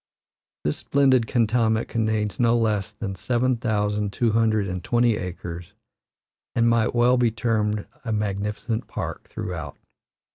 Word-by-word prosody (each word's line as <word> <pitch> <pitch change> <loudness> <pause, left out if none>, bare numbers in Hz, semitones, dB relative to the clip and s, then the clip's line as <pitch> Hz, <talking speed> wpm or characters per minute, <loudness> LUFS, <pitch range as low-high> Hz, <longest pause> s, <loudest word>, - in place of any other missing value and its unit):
This 75 - -1
splendid 130 -4 +3
cantonment 115 -1 +2
contains 110 -2 -1
no 120 -1 +4
less 105 -4 0
than 100 -3 -5
seven 125 +5 0
thousand 105 -3 0
two 115 +2 +1
hundred 110 -2 +2
and 90 -1 -4
twenty 120 0 +3
acres 90 -2 -6 0.8
and 115 0 +3
might 115 0 +2
well 120 +2 +4
be 120 -1 +3
termed 105 -2 0 0.2
a 115 - -3
magnificent 105 +2 -2
park - - -5
throughout. - - -5
110 Hz, 135 wpm, -24 LUFS, 105-120 Hz, 0.8 s, no